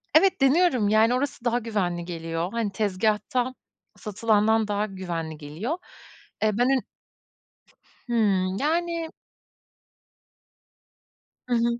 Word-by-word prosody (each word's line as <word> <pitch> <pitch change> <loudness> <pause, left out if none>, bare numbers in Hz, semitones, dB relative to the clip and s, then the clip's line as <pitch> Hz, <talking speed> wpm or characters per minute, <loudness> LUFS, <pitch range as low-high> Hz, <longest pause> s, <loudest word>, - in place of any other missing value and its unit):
Evet, 375 +1 +5
deniyorum, 270 - +4
yani, 220 +3 +4
orası 260 -2 -3
daha 240 0 +2
güvenli 190 -7 -2
geliyor. 165 0 -3
Hani, 230 -3 -1
tezgâhtan 215 +5 0 0.4
satılandan 220 +1 +2
daha 205 0 0
güvenli 175 -5 -5
geliyor. 160 - -4 0.7
Eee, 215 - +4
ben 245 - +3
önün 270 -1 +2 1.3
Hımm, 195 -5 +2
yani 335 - -1 2.4
Hı 245 - +1
hı. 235 0 +1
220 Hz, 100 wpm, -25 LUFS, 190-250 Hz, 2.4 s, Evet